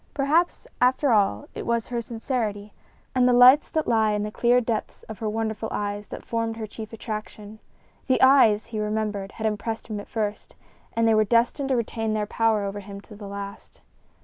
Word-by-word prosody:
Perhaps, 305 Hz, +5 st, +1 dB, 0.2 s
after 255 Hz, +2 st, +3 dB
all, 195 Hz, -, +2 dB
it -, -, -6 dB
was 235 Hz, -1 st, -1 dB
her 240 Hz, -1 st, -2 dB
sincerity 225 Hz, -3 st, -3 dB, 0.4 s
and 250 Hz, -1 st, +4 dB
the -, -, +4 dB
lights 250 Hz, +4 st, +7 dB
that 315 Hz, -1 st, -1 dB
lay 220 Hz, -2 st, +2 dB
in 210 Hz, -, -1 dB
the 210 Hz, -, -4 dB
clear 240 Hz, +2 st, +3 dB
depths 225 Hz, -3 st, -3 dB
of 220 Hz, -, -9 dB
her 220 Hz, -, -2 dB
wonderful 220 Hz, 0 st, -3 dB
eyes 205 Hz, 0 st, -3 dB
that -, -, -9 dB
formed 230 Hz, -1 st, -2 dB
her 220 Hz, -, -4 dB
chief 215 Hz, +1 st, -9 dB
attraction. 215 Hz, -1 st, -7 dB, 0.5 s
The 260 Hz, -, +3 dB
eyes, 260 Hz, -6 st, +5 dB
he 225 Hz, -2 st, -5 dB
remembered, 210 Hz, -2 st, -2 dB
had 220 Hz, -, -5 dB
impressed 220 Hz, +1 st, -2 dB
him 210 Hz, -1 st, -3 dB
at 205 Hz, -, -10 dB
first, 210 Hz, -2 st, -4 dB, 0.4 s
and 230 Hz, 0 st, +2 dB
they 225 Hz, -, +4 dB
were 215 Hz, 0 st, +4 dB
destined 240 Hz, +5 st, +1 dB
to 265 Hz, -, +2 dB
retain 225 Hz, -2 st, -2 dB
their 210 Hz, -1 st, 0 dB
power 220 Hz, -1 st, +1 dB
over 200 Hz, +1 st, -4 dB
him 200 Hz, 0 st, -9 dB
to 210 Hz, +1 st, -14 dB
the 205 Hz, -1 st, -9 dB
last. 200 Hz, 0 st, -8 dB
220 Hz, 200 wpm, -25 LUFS, 210-235 Hz, 0.5 s, lights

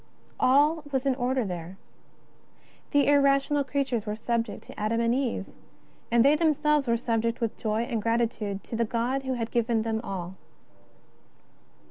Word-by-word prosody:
All 295 Hz, +5 st, +4 dB
was 265 Hz, -1 st, -1 dB
in 270 Hz, -, +3 dB
order 255 Hz, -1 st, 0 dB
there. 180 Hz, 0 st, -6 dB, 1.1 s
The 285 Hz, 0 st, +3 dB
irrational 280 Hz, 0 st, +3 dB
creatures 265 Hz, -5 st, -2 dB
were 210 Hz, -, -2 dB
subject 230 Hz, 0 st, -2 dB
to -, -, -12 dB
Adam 215 Hz, +2 st, 0 dB
and 235 Hz, 0 st, +2 dB
Eve, 250 Hz, -6 st, -1 dB, 0.6 s
and 235 Hz, +1 st, +4 dB
they 285 Hz, +2 st, +6 dB
themselves 300 Hz, -3 st, +2 dB
were 235 Hz, 0 st, +2 dB
subject 230 Hz, -1 st, -1 dB
with 230 Hz, -2 st, -2 dB
joy 220 Hz, 0 st, -1 dB
and 235 Hz, -3 st, -2 dB
gratitude 225 Hz, -3 st, -1 dB
to -, -, -6 dB
the 230 Hz, -, +1 dB
God 235 Hz, +4 st, -1 dB
who 260 Hz, -1 st, -2 dB
had 230 Hz, -2 st, -3 dB
given 235 Hz, -1 st, +1 dB
them 220 Hz, -1 st, -2 dB
all. 190 Hz, -3 st, -5 dB
235 Hz, 155 wpm, -27 LUFS, 225-275 Hz, 1.1 s, they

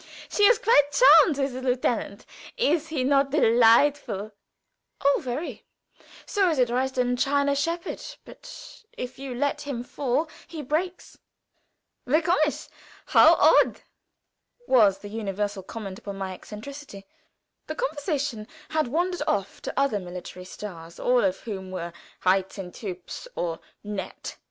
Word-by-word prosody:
she -, -, -2 dB
is 470 Hz, +2 st, +6 dB
quite 430 Hz, -, +4 dB
charmed 355 Hz, -, +7 dB
with 275 Hz, -2 st, -1 dB
the 255 Hz, -, -5 dB
Herr 260 Hz, -, -1 dB
Lieutenant! 240 Hz, -4 st, -1 dB, 0.3 s
Is 325 Hz, -9 st, +1 dB
he 305 Hz, -5 st, -2 dB
not 275 Hz, +1 st, +3 dB
delightful?" 230 Hz, -4 st, +3 dB, 0.7 s
"Oh, 280 Hz, 0 st, +2 dB
very; 255 Hz, -2 st, -5 dB, 0.6 s
so 390 Hz, -3 st, +2 dB
is 320 Hz, -, 0 dB
a 250 Hz, -, +4 dB
Dresden 250 Hz, 0 st, 0 dB
china 280 Hz, +2 st, +2 dB
shepherd, 335 Hz, +4 st, -2 dB, 0.2 s
but -, -, -12 dB
if 250 Hz, +1 st, -7 dB
you 270 Hz, -2 st, -6 dB
let 285 Hz, +3 st, -1 dB
him 275 Hz, -5 st, -4 dB
fall 275 Hz, +4 st, -1 dB, 0.2 s
he 315 Hz, -3 st, -7 dB
breaks." 340 Hz, +7 st, -3 dB, 0.9 s
"Wie 300 Hz, +5 st, +4 dB
komisch! 310 Hz, -3 st, 0 dB, 0.4 s
how -, -, +7 dB
odd!" -, -, +4 dB, 0.8 s
was 210 Hz, -, +5 dB
the 205 Hz, +1 st, -10 dB
universal 205 Hz, -2 st, -3 dB
comment 195 Hz, -1 st, -7 dB
upon 200 Hz, -1 st, -7 dB
my 190 Hz, -1 st, -4 dB
eccentricity. 215 Hz, +1 st, -10 dB, 0.6 s
The 310 Hz, -, -4 dB
conversation 285 Hz, -, -2 dB, 0.2 s
had 310 Hz, -3 st, 0 dB
wandered 350 Hz, +6 st, -1 dB
off 200 Hz, -8 st, -1 dB
to -, -, -3 dB
other 275 Hz, -7 st, +1 dB
military 180 Hz, 0 st, -8 dB
stars, 170 Hz, -4 st, -9 dB
all 245 Hz, -1 st, +3 dB
of 190 Hz, -1 st, 0 dB
whom 190 Hz, -4 st, -6 dB
were 170 Hz, -2 st, -5 dB, 0.3 s
reizend, 190 Hz, 0 st, 0 dB
hübsch, 185 Hz, -, -7 dB
or 165 Hz, -2 st, -2 dB, 0.2 s
nett. 205 Hz, -2 st, -6 dB
250 Hz, 135 wpm, -26 LUFS, 200-290 Hz, 0.9 s, charmed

